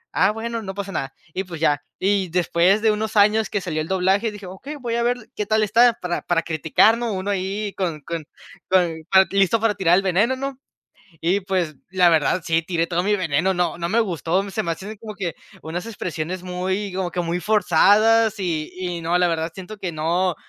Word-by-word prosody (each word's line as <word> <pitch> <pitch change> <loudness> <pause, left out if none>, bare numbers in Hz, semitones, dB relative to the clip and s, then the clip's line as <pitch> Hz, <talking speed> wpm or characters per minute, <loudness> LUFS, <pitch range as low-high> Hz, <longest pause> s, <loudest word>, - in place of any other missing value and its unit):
"Ah 190 - +4
bueno, 230 +1 -4
no 190 -2 -6
pasa 200 -1 -5
nada", 135 0 -3 0.2
y 190 - -2
pues 175 -4 -8
ya. 145 -2 +1 0.2
Y, 200 -2 +2
después 180 +3 +2
de 220 -1 +4
unos 215 +1 -3
años 215 +1 +4
que 205 - -2
salió 155 -4 -2
el 155 - -5
doblaje, 190 +4 +1
dije: 205 -1 -10
"Okey, 190 +12 -8
voy 245 -5 -4
a 235 - 0
ver 245 +1 +1 0.2
qué 210 - -2
tal 220 0 +2
está 230 +3 +5
para 175 -1 -2
para 170 -1 +1
criticar, 165 +8 +3
¿no?, 235 -3 -2
uno 195 +2 -2
ahí 200 +2 -2
con 170 -6 -2
con 165 +2 -5 0.4
con 175 -4 +2
con 190 0 +6
listo 195 +3 +3
para 220 -1 +2
tirar 175 -2 +3
el 195 - +2
veneno", 200 +8 +2
¿no?, 275 0 -5 0.6
y 180 +5 +2
pues, 180 -5 -1
la 180 -1 +4
verdad 165 +2 +2
sí, 165 0 +1
tiré 170 -1 0
todo 175 0 0
mi 210 +1 +2
veneno, 185 0 +1
no 175 -1 -1
no 170 0 -2
me 225 +5 +2
gustó, 185 0 -1
se 215 - -1
me 170 - -1
hacen 200 +5 -7
como 215 0 -8
que 185 -5 -4 0.3
unas 170 +4 -5
expresiones 180 -4 -5
muy, 185 +2 -2
como 185 -2 -2
que 175 - -1
muy 170 +1 -2
forzadas 215 +3 +4
y 165 -5 -2
y 180 -2 -4
no, 170 +2 +1
la 180 - +3
verdad 165 0 -2
siento 190 +3 -9
que 185 -3 -4
no, 170 +3 0
190 Hz, 215 wpm, -22 LUFS, 170-210 Hz, 0.6 s, con